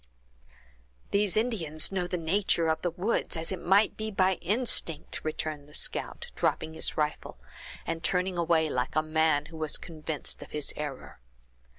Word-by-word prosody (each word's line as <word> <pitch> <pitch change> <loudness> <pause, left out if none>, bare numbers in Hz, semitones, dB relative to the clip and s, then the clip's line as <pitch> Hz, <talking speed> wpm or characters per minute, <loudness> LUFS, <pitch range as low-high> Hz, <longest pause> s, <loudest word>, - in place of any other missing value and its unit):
"These 200 0 +3
Indians 185 -11 +2
know 185 -2 -1
the 180 - -2
nature 170 0 +2
of 160 0 +1
the 175 - +1
woods, 180 +1 0
as 165 +2 -2
it 185 -2 -3
might 195 +4 +4
be 220 0 -3
by 190 -3 +2
instinct!" 185 - 0
returned 155 -2 -4
the 150 - -7
scout, - - -1
dropping 160 0 0
his - - -1
rifle, 150 - -1 0.5
and 165 +1 -3
turning 180 0 +1
away 165 -2 +3
like 125 -2 -1
a 155 - +3
man 155 -2 +2
who 160 +1 -10
was 155 -1 -1
convinced 155 -2 -3
of - - -9
his 150 -1 -2
error. 145 - -6
165 Hz, 165 wpm, -29 LUFS, 155-190 Hz, 0.5 s, might